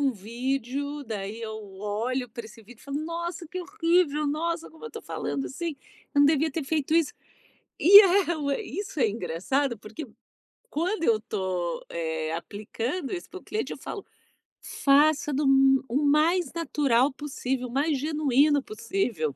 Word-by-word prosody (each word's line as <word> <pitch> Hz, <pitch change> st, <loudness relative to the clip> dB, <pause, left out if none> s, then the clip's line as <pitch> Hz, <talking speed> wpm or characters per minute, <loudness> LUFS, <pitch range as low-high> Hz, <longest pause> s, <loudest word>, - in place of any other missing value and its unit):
um 275 Hz, -2 st, +2 dB
vídeo, 260 Hz, +6 st, -3 dB
daí 215 Hz, -1 st, -5 dB
eu 220 Hz, -1 st, -5 dB, 0.3 s
olho 235 Hz, +5 st, -2 dB
pra 235 Hz, +1 st, -8 dB
esse 220 Hz, +1 st, -13 dB
vídeo 235 Hz, +2 st, -16 dB
e -, -, -17 dB
falo: 280 Hz, +1 st, -3 dB
"Nossa, 340 Hz, +1 st, -4 dB
que 365 Hz, +1 st, -5 dB
horrível, 340 Hz, -5 st, +1 dB
nossa, 330 Hz, +3 st, -2 dB
como 320 Hz, +7 st, -14 dB
eu 460 Hz, -, -6 dB
tô -, -, -8 dB
falando 275 Hz, -, -3 dB
assim, 330 Hz, +2 st, -4 dB, 0.4 s
eu 285 Hz, -, +5 dB
não 285 Hz, -, +7 dB
devia 310 Hz, +1 st, +2 dB
ter 310 Hz, +2 st, -3 dB
feito 305 Hz, +1 st, -1 dB
isso". 330 Hz, -3 st, +3 dB, 0.7 s
E 400 Hz, +5 st, +11 dB
é, 345 Hz, -8 st, +2 dB
isso 345 Hz, -, -5 dB
é 225 Hz, -, +4 dB
engraçado, 210 Hz, -, -1 dB
porque 220 Hz, +8 st, -8 dB, 0.6 s
quando 340 Hz, +3 st, -1 dB
eu 220 Hz, -2 st, +3 dB
tô, 185 Hz, -5 st, -3 dB
eh, 160 Hz, -1 st, -3 dB
aplicando 230 Hz, -, -4 dB
isso 355 Hz, -, -7 dB
pro 375 Hz, -, -9 dB
cliente, 430 Hz, -, -3 dB
eu -, -, -7 dB
falo 405 Hz, -, -7 dB, 0.6 s
faça 295 Hz, +1 st, +3 dB
do 290 Hz, +3 st, 0 dB
m 270 Hz, 0 st, +5 dB
o 235 Hz, -, -5 dB
mais 305 Hz, +3 st, +3 dB
natural 285 Hz, -6 st, +2 dB
possível, 265 Hz, -3 st, -3 dB
o -, -, -10 dB
mais 285 Hz, +2 st, +1 dB
genuíno 290 Hz, -1 st, +2 dB
possível. 220 Hz, -, -2 dB
280 Hz, 160 wpm, -27 LUFS, 230-320 Hz, 0.7 s, E